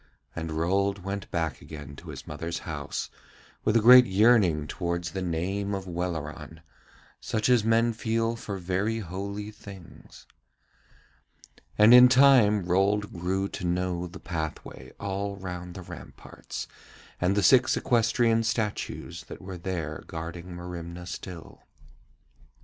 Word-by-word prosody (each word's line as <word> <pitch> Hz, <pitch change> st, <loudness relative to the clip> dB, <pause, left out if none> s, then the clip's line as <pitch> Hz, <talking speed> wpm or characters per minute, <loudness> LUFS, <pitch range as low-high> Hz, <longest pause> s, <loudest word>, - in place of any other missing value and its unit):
And 80 Hz, -1 st, -4 dB
Rold 95 Hz, +4 st, 0 dB
went 100 Hz, +1 st, -5 dB
back 80 Hz, -5 st, -2 dB
again 70 Hz, -2 st, -9 dB
to -, -, -11 dB
his -, -, -8 dB
mother's 85 Hz, 0 st, -5 dB
house 75 Hz, -4 st, -4 dB, 0.5 s
with 110 Hz, -, +1 dB
a -, -, +3 dB
great 125 Hz, +2 st, +9 dB
yearning 95 Hz, -6 st, +4 dB
towards 85 Hz, 0 st, -3 dB
the 95 Hz, -, -4 dB
name 95 Hz, +4 st, -2 dB
of 95 Hz, -1 st, -5 dB
Welleran, 80 Hz, -3 st, -5 dB, 0.6 s
such 110 Hz, -1 st, -1 dB
as 125 Hz, -4 st, +4 dB
men 115 Hz, +1 st, +3 dB
feel 115 Hz, 0 st, -1 dB
for 105 Hz, -3 st, -6 dB
very 95 Hz, +5 st, -1 dB
holy 100 Hz, +2 st, -5 dB
things. 100 Hz, -4 st, -13 dB, 1.5 s
And 105 Hz, +3 st, +7 dB
in 125 Hz, 0 st, +10 dB
time 125 Hz, -6 st, +6 dB
Rold 100 Hz, +4 st, +1 dB
grew 95 Hz, +3 st, -1 dB
to -, -, -7 dB
know 90 Hz, 0 st, -1 dB
the 85 Hz, -, -11 dB
pathway 80 Hz, -5 st, -6 dB
all 100 Hz, 0 st, -3 dB
round 90 Hz, -2 st, -7 dB
the 95 Hz, -, -7 dB
ramparts, 85 Hz, -1 st, -9 dB, 0.5 s
and 95 Hz, +3 st, +1 dB
the 100 Hz, -, +2 dB
six 130 Hz, +3 st, +5 dB
equestrian 115 Hz, -1 st, +2 dB
statues 110 Hz, -2 st, -3 dB
that -, -, -9 dB
were 95 Hz, -1 st, -8 dB
there 85 Hz, -4 st, -4 dB
guarding 85 Hz, +2 st, -7 dB
Merimna 90 Hz, 0 st, -7 dB
still. 90 Hz, -1 st, -8 dB
95 Hz, 135 wpm, -27 LUFS, 85-105 Hz, 1.5 s, in